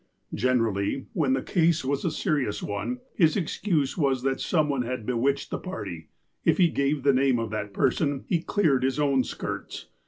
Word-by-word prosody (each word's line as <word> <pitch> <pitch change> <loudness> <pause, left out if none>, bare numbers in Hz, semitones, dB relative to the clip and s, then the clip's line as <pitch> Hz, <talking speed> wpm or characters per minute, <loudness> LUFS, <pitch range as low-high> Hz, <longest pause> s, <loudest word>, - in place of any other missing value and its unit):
Generally, 115 -1 0
when 140 -5 +1
the 130 - 0
case 165 -4 +2
was 140 +1 -1
a - - +1
serious 150 - -1
one, 110 +5 -3
his 160 -3 +3
excuse 165 -5 0
was 135 -6 +1
that 135 0 0
some 155 -4 +2
one 140 -3 0
had 125 -2 -4
bewitched 130 +4 0
the - - -2
party. 85 - -6 0.4
If - - +3
he 175 -2 +5
gave 140 -1 0
the 140 - +5
name 130 -1 +3
of 115 -2 -3
that 105 -1 -3
person, 140 +4 0
he 170 -3 0
cleared 160 -8 +2
his 130 +1 0
own 140 -3 +3
skirts. - - -6
135 Hz, 185 wpm, -26 LUFS, 125-155 Hz, 0.4 s, he